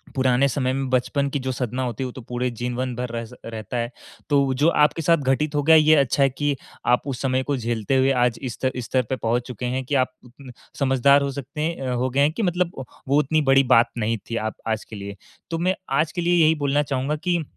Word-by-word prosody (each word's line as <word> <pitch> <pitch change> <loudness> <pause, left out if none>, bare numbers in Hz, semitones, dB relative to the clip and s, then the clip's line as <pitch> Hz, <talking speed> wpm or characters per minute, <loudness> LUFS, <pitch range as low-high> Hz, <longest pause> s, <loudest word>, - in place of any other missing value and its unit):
पुराने 130 0 +3
समय 130 -1 -1
में 135 0 -2
बचपन 130 +3 0
की 145 - -2
जो 130 0 -3
सदमा 125 0 -3
होती 125 0 -3
है, - - -2
वो 125 - -5
तो 130 - -10
पूरे 125 +1 -3
जीवन 125 +2 -3
भर 125 +1 -4
रहता 115 0 -4
स - - -21 0.2
रहता 110 +2 -5
है। 120 0 -2 0.4
तो 140 -2 +3
जो 145 +5 +2
आपके 150 0 +2
साथ 165 +2 +4
घटित 145 +2 0
हो 145 - +1
गया, 160 +3 +6
ये 155 0 +6
अच्छा 140 -1 +2
है 135 - +4
कि 145 +2 -1 0.3
आप 125 0 +3
उस 130 -3 -4
समय 130 -1 0
को 145 +1 -1
झेलते 115 0 -1
हुए, 130 +1 +3
आज 125 -2 +1
इस 130 -4 -4
स्तर 130 +2 -1
इस 125 -2 -4
स्तर 130 +2 +1
पे 130 - 0
पहुँच 120 0 -1
चुके 125 -1 -6
हैं 130 +2 -2
कि 145 - -1
आप 130 - -9 0.7
समझदार 140 +1 +4
हो 140 0 -1
सकते 140 +2 -6
हैं 165 +2 -2
अ, 130 -1 -2
हो 125 +1 0
गए 135 +2 -1
हैं 145 +2 +4
कि 220 - -3
मतलब 180 -2 0 0.4
वो 140 +2 +3
उतनी 155 +2 +1
बड़ी 135 0 +6
बात 115 +1 +4
नहीं 115 0 0
थी 115 - -3
आप - - -14
आज 110 0 -1
के 110 - -10
लिए। 100 0 -7 0.4
तो 165 - -1
मैं 185 +3 +1 0.2
आज 155 +1 +1
के 175 - -3
लिए 175 -1 +3
यही 160 +1 +4
बोलना 145 +1 +2
चाहूँगा 140 +1 -2
कि 175 -2 +1
130 Hz, 255 wpm, -23 LUFS, 125-145 Hz, 0.7 s, गया